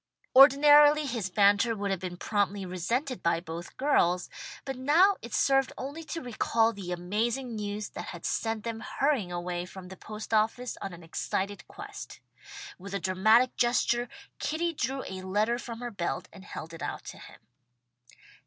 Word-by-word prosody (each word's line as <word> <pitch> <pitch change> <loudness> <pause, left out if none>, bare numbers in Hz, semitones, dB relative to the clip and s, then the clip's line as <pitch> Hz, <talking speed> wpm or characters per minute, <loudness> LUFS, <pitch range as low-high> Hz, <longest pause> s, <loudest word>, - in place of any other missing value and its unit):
Ordinarily 290 +2 +8
his 230 -8 -2
banter 205 +3 +4
would 200 -1 -2
have 190 - -1
been 180 -1 -6
promptly 200 -1 -1
resented 230 - -2
by 170 0 +2
both 170 0 -8
girls, 180 -11 +2 0.4
but 270 -1 -3
now 325 +10 +4
it 235 - -9
served 270 +2 +2
only 285 +5 -6
to 330 +1 -5
recall 230 -1 +1
the 190 -4 -7
amazing 220 +8 -2
news 210 0 -4
that - - -7
had - - -8
sent 225 -1 -1
them 230 -1 -4
hurrying 265 -8 0
away 175 0 -3
from 185 -1 -10
the 190 - -9
post 215 +3 -8
office 225 +3 +1
on 195 - -4
an 170 0 -11
excited 190 +3 -3
quest. 410 +1 -9 0.6
With 200 +2 -7
a - - -1
dramatic 220 +7 +3
gesture, 240 0 +2 0.3
Kitty 335 +2 -1
drew 265 -1 -2
a 190 0 -6
letter 210 +6 0
from 230 -1 -7
her 240 -1 -4
belt 180 -5 -3
and 190 0 -13
held 165 -4 -8
it 165 - -9
out - - -4
to - - -9
him. - - -13
220 Hz, 170 wpm, -29 LUFS, 190-260 Hz, 0.6 s, Ordinarily